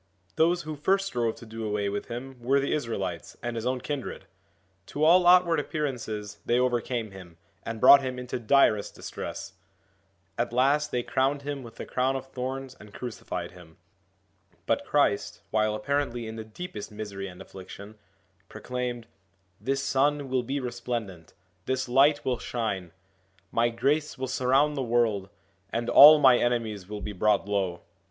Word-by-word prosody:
Those 170 +2 +2
who 155 0 -5
first 195 +7 +1
strove 120 -10 -1
to - - -12
do 110 0 -7
away 105 -1 -1
with 100 +1 -3
him 125 +2 -7
were 135 +4 +2
the 140 - -1
Israelites 100 - -4
and 120 -1 -3
his 115 +1 -3
own 130 0 0
kindred. 145 -1 -5 0.6
To 150 - -3
all 175 +3 +6
outward 175 -3 +6
appearances 120 -9 -4
they 120 - +1
overcame 120 -3 -1
him, 90 -4 -12 0.2
and 115 -1 -6
brought 140 +3 +9
him 130 -1 -4
into 125 0 -4
direst 110 -4 +3
distress. - - -7 0.9
At 120 0 -1
last 140 +4 +2
they 125 - -1
crowned 140 +3 0
him 145 -1 -4
with 115 -2 -11
the - - -7
crown 130 +1 0
of 130 - -4
thorns 130 +1 -5
and 105 0 -14
crucified 100 -7 -5
him. 90 -3 -16 0.9
But - - 0
Christ, - - +1
while 110 -1 +1
apparently 120 +1 -2
in 110 0 -6
the 110 - -6
deepest 110 - -8
misery 100 -2 -6
and 90 -1 -11
affliction, 100 +3 -11 0.5
proclaimed: 120 +1 -4 0.3
' 95 -1 -40
This 135 +1 -1
Sun 140 0 +1
will 130 -1 +1
be 135 +4 -3
resplendent, 120 -8 -5 0.3
this 130 0 -1
Light 140 +4 +4
will 125 -3 0
shine, 100 -9 -3 0.6
my 115 +1 +2
grace 145 +6 0
will 130 - -3
surround 135 +3 +2
the 140 - -2
world, 115 -5 +1 0.4
and 115 +1 -2
all 150 +2 +10
my 130 -4 +6
enemies 110 -6 -1
will 105 -1 -6
be 105 - -5
brought 105 +1 +2
low.' 95 -4 -1
120 Hz, 165 wpm, -27 LUFS, 105-135 Hz, 0.9 s, all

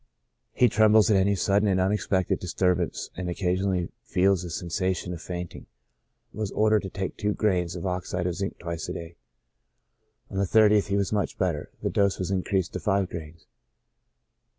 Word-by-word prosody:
He 125 - +4
trembles 110 -2 +5
at 100 - +5
any 100 +1 +3
sudden 100 +2 +2
and 95 -2 +2
unexpected 95 -1 +1
dis 90 - -6
turbance, 90 -2 0
and 90 0 -4
occasionally 90 0 -1
feels 95 0 +2
a 90 - -6
sensation 90 +2 -2
of 85 - -7
fainting. 90 0 -6 0.7
Was 110 -1 -3
ordered 110 -1 +3
to 95 - -6
take 95 0 -4
tv^o 105 -1 -1
grains 90 -5 +1
of 90 - -5
oxide 90 -1 -2
of 90 - 0
zinc 100 +3 -4
twice 85 -2 -5
a - - -3
day. 85 0 -8 1.2
On 95 - -2
the 100 - +2
30th 105 0 +5
he 100 0 0
was 100 +1 0
much 105 -1 -1
better; 85 -6 -1
the - - 0
dose 100 -1 +2
was 95 0 -3
increased 95 -1 0
to - - -3
five 100 -3 +1
grains. 80 -1 -8
95 Hz, 175 wpm, -26 LUFS, 90-100 Hz, 1.2 s, trembles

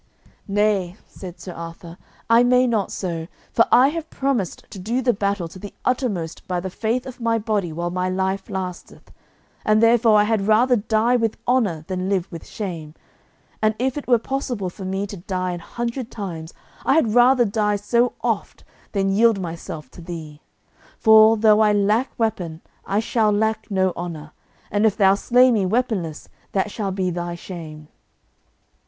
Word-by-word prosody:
"Nay," 200 -3 +1
said 180 -2 -10
Sir 180 - -8
Arthur, 170 0 -9 0.3
"I 230 +1 +6
may 250 +1 +4
not 220 -5 0
so, 165 -4 -4 0.2
for 230 - +4
I 260 +3 +6
have 325 +1 -5
promised 265 -10 -2
to 195 - -8
do 225 +7 -1
the 245 -1 +3
battle 200 -3 -1
to 185 - -12
the 205 +1 -9
uttermost 205 -11 -2
by 180 -1 -1
the 185 +1 -5
faith 230 +6 -1
of 255 -1 -9
my 230 0 +1
body 210 -5 -1
while 170 +2 -3
my 180 +1 -1
life 190 +2 -2
lasteth, 185 -3 -6 0.5
and 215 0 +3
therefore 230 -1 +5
I 210 - +5
had 210 -2 0
rather 240 +4 +4
die 225 +3 +2
with 225 -2 -1
honour 205 -11 +1
than 185 0 -3
live 190 -2 -1
with 165 -2 -9
shame; 165 -7 -6 0.7
and 215 0 +2
if 255 +1 -1
it 295 - -6
were 245 -2 +5
possible 240 -6 -3
for 190 - -9
me 195 +1 -2
to 200 0 -8
die 185 0 -3
an 175 - -4
hundred 235 +6 -4
times, 170 -6 -6 0.3
I 270 - +3
had 235 -10 +2
rather 245 +1 +5
die 210 0 0
so 235 +4 +1
oft - - -2 0.3
than 195 -1 +1
yield 220 +1 +4
myself 165 -5 -7
to - - -12
thee; 160 -3 -8 0.6
for, 220 0 +6
though 215 0 +5
I 215 -1 +4
lack 210 +5 +2
weapon 180 -8 -2 0.3
I 200 +2 +1
shall 220 -2 +1
lack 220 +1 0
no 190 -2 +1
honour, 160 -3 -6 0.4
and 205 +1 +1
if 210 - -1
thou 195 -3 +5
slay 250 +5 +4
me 215 -4 +2
weaponless 195 -8 -1 0.3
that 195 +1 0
shall 205 -2 -3
be 185 -1 -1
thy 175 0 -4
shame." 160 -4 -9
205 Hz, 175 wpm, -22 LUFS, 180-230 Hz, 0.7 s, I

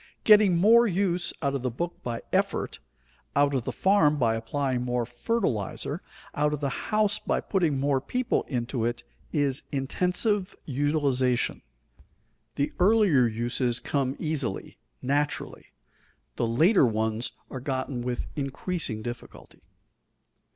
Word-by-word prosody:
Getting 210 -5 +6
more 230 +6 +6
use 180 -2 +1
out 140 0 +1
of 140 - -2
the 125 - -1
book 170 +9 -5
by 120 -1 -4
effort, - - 0 0.6
out 145 0 +3
of 130 -4 -1
the - - -2
farm 190 -7 +3
by 115 -5 +2
applying 125 +3 -1
more 125 -1 -1
fertilizer, 120 - -2 0.3
out 150 +1 +1
of 150 - -2
the 140 -3 -3
house 210 -1 +2
by - - -1
putting 165 -8 0
more 140 -1 +1
people 250 - 0
into 120 -2 -2
it, 120 +1 -2 0.3
is 145 -3 0
intensive 180 - 0
utilization. 135 -3 0 0.9
The 140 0 -1
earlier 185 - +5
uses 120 +2 0
come 135 -2 -1
easily, 145 -10 -3 0.2
naturally; 145 +3 -1 0.7
the 115 - 0
later 160 - +4
ones 110 +1 -1 0.2
are 130 - -5
gotten 130 -1 -3
with 125 0 -3
increasing 140 -4 -3
difficulty. 120 +1 -9
140 Hz, 130 wpm, -27 LUFS, 120-175 Hz, 0.9 s, Getting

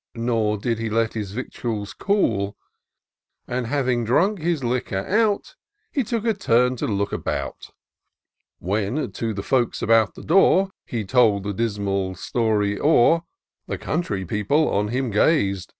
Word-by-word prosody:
Nor 115 -2 0
did 115 +2 -2
he 115 -1 -2
let 115 +1 0
his 105 -4 -4
victuals 110 -2 -4
cool; 105 - 0 0.9
And, 125 -1 -2
having 130 -3 0
drunk 185 - +2
his 165 -3 -1
liquor 120 -5 -1
out. 210 0 +1 0.4
He 275 - 0
took 230 0 -3
a 225 - +3
turn 125 - +2
to - - -2
look 100 -1 -1
about. - - -4 0.9
When 105 +7 -2
to 115 +3 -3
the 100 - -4
folks 125 -1 +1
about 115 -2 +3
the - - -10
door, 190 +2 +4 0.2
He 115 -4 -3
told 105 -2 +3
the 100 0 -3
dismal 100 -3 -1
story 105 0 0
o'er, 160 +2 +4 0.5
The - - -3
country 110 - -2
people 105 - +1
on 105 +1 +1
him 125 +2 -2
gaz'd. 100 - +2
115 Hz, 150 wpm, -23 LUFS, 105-140 Hz, 0.9 s, door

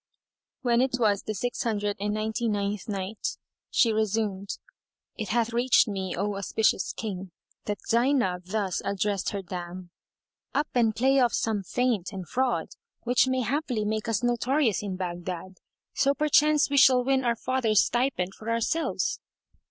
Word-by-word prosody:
When 240 -1 +3
it 260 -1 +1
was 210 -4 +2
the 215 - -4
Six 245 +5 -2
Hundred 205 -3 -1
and 205 +1 -1
Ninety 220 +2 -1
ninth 205 +1 -2
Night, 200 +1 -3 0.3
She 230 -2 +3
resumed, 210 -2 -1 0.6
It 215 -3 -5
hath 235 +1 +1
reached 240 +1 +4
me, 190 -3 -3
O 205 +3 -1
auspicious 200 0 +1
King, 195 -4 -5 0.4
that 205 -1 -2
Zaynab 235 -7 +2
thus 195 -1 -1
addressed 200 0 -1
her 200 -1 -4
dam, 175 0 -7 0.6
"Up 300 - +1
and 225 -3 +2
play 265 +4 +3
off 245 -2 +3
some 220 -3 0
feint 220 -1 -1
and 190 -4 -7
fraud 260 -1 0 0.3
which 245 +2 +3
may 260 0 +1
haply 245 -2 -1
make 215 +1 -2
us 225 +2 0
notorious 245 - +1
in 200 -3 -4
Baghdad, 180 0 -5 0.3
so 280 +1 +2
perchance 300 0 +4
we 280 - +2
shall 255 -2 +6
win 265 +1 +2
our 235 -1 +2
father's 230 -3 +2
stipend 240 -7 0
for 220 +3 -8
ourselves." 230 +8 0
220 Hz, 155 wpm, -27 LUFS, 195-245 Hz, 0.6 s, shall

